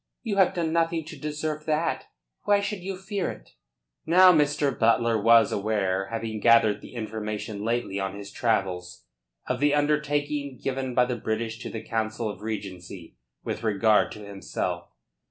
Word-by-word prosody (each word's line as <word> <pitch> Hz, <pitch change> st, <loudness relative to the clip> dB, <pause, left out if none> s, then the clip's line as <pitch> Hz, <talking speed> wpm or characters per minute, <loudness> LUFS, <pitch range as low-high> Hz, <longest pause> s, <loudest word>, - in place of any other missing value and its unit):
You 210 Hz, -5 st, -2 dB
have 190 Hz, -2 st, +4 dB
done 165 Hz, -2 st, -1 dB
nothing 165 Hz, -1 st, +1 dB
to 160 Hz, +1 st, -9 dB
deserve 150 Hz, 0 st, -4 dB
that. 155 Hz, +2 st, 0 dB, 0.4 s
Why 205 Hz, 0 st, +4 dB
should 200 Hz, 0 st, -3 dB
you 190 Hz, +1 st, -5 dB
fear 195 Hz, 0 st, -3 dB
it?" -, -, -10 dB, 0.5 s
Now 180 Hz, +3 st, +7 dB
Mr. 145 Hz, -3 st, +2 dB
Butler 115 Hz, -1 st, +2 dB
was 115 Hz, 0 st, +6 dB
aware 100 Hz, -2 st, 0 dB
having 110 Hz, 0 st, -4 dB
gathered 110 Hz, -2 st, +4 dB
the -, -, -12 dB
information 110 Hz, -2 st, -4 dB
lately 115 Hz, -3 st, -1 dB
on 95 Hz, +1 st, -3 dB
his 100 Hz, 0 st, -9 dB
travels 95 Hz, -6 st, -1 dB, 0.4 s
of -, -, -2 dB
the 145 Hz, +1 st, +3 dB
undertaking 145 Hz, -2 st, 0 dB
given 130 Hz, -2 st, -3 dB
by 125 Hz, -, +5 dB
the 125 Hz, -1 st, -3 dB
British 110 Hz, +1 st, -3 dB
to -, -, -6 dB
the 110 Hz, -1 st, -6 dB
Council 110 Hz, 0 st, -2 dB
of 105 Hz, -2 st, -6 dB
Regency 95 Hz, -, -7 dB, 0.3 s
with -, -, -4 dB
regard 110 Hz, -1 st, +3 dB
to 105 Hz, -1 st, -10 dB
himself. 100 Hz, -1 st, -4 dB
115 Hz, 160 wpm, -26 LUFS, 105-150 Hz, 0.5 s, Now